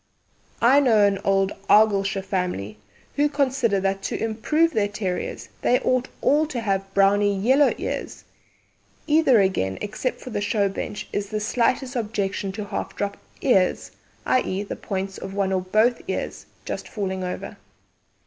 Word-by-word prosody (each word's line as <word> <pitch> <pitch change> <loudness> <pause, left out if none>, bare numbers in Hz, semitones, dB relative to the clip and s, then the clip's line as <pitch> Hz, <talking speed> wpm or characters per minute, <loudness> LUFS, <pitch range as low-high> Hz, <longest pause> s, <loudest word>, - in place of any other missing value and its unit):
I 260 +4 +7
know 225 -7 +4
an 200 -1 +1
old 195 0 +2 0.2
Argyllshire 200 -2 +4
family 180 - -3 0.4
who 295 +1 +3
consider 260 -7 +1
that 195 0 -1
to - - -3
improve 300 +9 +1
their 205 -2 +2
terriers 190 -3 -4
they 250 - +3
ought 255 0 +1
all 300 +2 +3
to 270 -6 -4
have 195 -3 -1
browny 200 0 +3
yellow 265 +8 +4
ears. - - -5 0.8
Neither 300 -6 +5
again, 95 - 0
except 215 +5 -3
for 255 - -9
the 205 - -2
show 205 -1 +1
bench, 200 +1 -5
is 200 -1 -2
there 215 - -2
the 210 - -3
slightest 250 +3 0
objection 205 -4 -2
to 210 0 -5
half 200 - -5
drop 200 0 -2 0.3
ears 195 -9 +2 0.3
i.e., 200 -6 +1
the 205 - -6
points 195 0 -4
of 195 - -7
one 195 -1 0
or 185 - +1
both 215 +6 +2
ears - - -4 0.2
just - - -5
falling 190 -3 -3
over. 180 - -5
205 Hz, 160 wpm, -24 LUFS, 195-245 Hz, 0.8 s, I